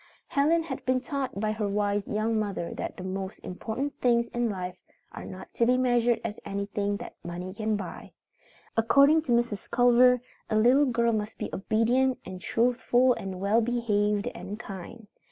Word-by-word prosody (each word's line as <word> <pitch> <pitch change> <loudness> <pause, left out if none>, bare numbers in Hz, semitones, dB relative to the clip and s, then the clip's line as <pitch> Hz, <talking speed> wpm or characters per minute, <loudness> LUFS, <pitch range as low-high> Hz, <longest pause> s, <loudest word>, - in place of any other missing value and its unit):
Helen 320 +4 +3
had 275 -5 -6
been 255 0 +2
taught 265 -4 -4
by 215 0 0
her 215 -1 -2
wise 205 0 0
young 215 +1 0
mother 200 -5 -3
that - - -5
the 185 - -7
most 190 0 -4
important 225 +9 -4
things 235 -1 +3
in 240 -1 -1
life 185 -2 -5 0.3
are - - -8
not 190 0 -10
to - - +1
be 250 +1 +4
measured 245 -2 +2
as 220 -2 -4
anything 200 0 -2
that - - -8
money 175 +2 -6
can 215 +1 -1
buy. 195 -4 -7 0.6
According 280 +7 +5
to 295 -5 -4
Mrs. 235 -3 0
Culver, 245 +1 +5 0.3
a 215 - 0
little 250 +7 +5
girl 235 -1 +2
must 215 0 -3
be - - -4
obedient 240 +6 +2
and 185 -1 -8
truthful 245 +3 +2
and 190 -5 -6
well 205 +4 +3
behaved 210 -3 +1
and 190 +4 -7
kind. 205 +1 -9
225 Hz, 170 wpm, -28 LUFS, 200-245 Hz, 0.6 s, According